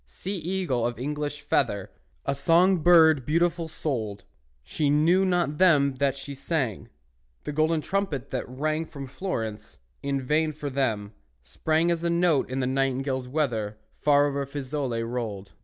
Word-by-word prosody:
Sea 65 - -6
eagle 170 -9 -1
of 120 -1 -5
English 150 +3 -3
feather, 120 -9 0 0.3
A 140 - +1
song 170 +7 +4
bird 160 -4 +6
beautiful 170 +3 +1
souled, 110 -11 -4 0.4
She 145 - -1
knew 165 +6 +4
not 175 -5 0
them 145 -7 +5
that 140 -1 +2
she 140 +1 -7
sang; 135 - -2 0.5
The - - -4
golden 155 +2 +1
trumpet 155 -7 -2
that 130 -1 -3
rang 155 +5 -2
From 140 -3 -8
Florence, 115 - -5 0.2
in 140 -1 -1
vain 155 +4 +1
for 145 -1 -5
them, 110 -6 -1 0.3
sprang 160 - 0
As 170 -1 -1
a 170 - +1
note 170 -5 +2
in 130 +1 -2
the - - 0
nightingales' 130 0 -1
weather 120 -7 -1 0.2
Far 145 -1 +4
over 140 -1 -1
Fiesole 135 -4 -3
rolled. 115 -5 -4
140 Hz, 155 wpm, -26 LUFS, 130-160 Hz, 0.5 s, bird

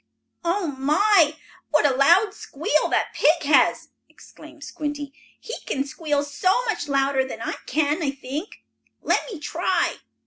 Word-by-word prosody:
"Oh 345 0 0
my! 315 +2 +3 0.3
what 300 -1 +3
a 280 - +4
loud 345 +10 +4
squeal 305 -5 -1
that - - 0
pig 320 +2 +3
has!" 290 0 +3 0.2
exclaimed 310 -1 -15
Squinty. 290 +1 -5 0.3
"He 460 - -8
can 270 - -1
squeal 290 0 -2 0.4
much 395 -9 -2
louder 275 -1 +1
than 260 -4 -7
I 230 - -3
can, 300 +3 0
I 295 - 0
think. 275 +7 -7 0.4
Let - - +1
me 385 - -6
try." 345 +3 -1
300 Hz, 140 wpm, -23 LUFS, 280-340 Hz, 0.4 s, a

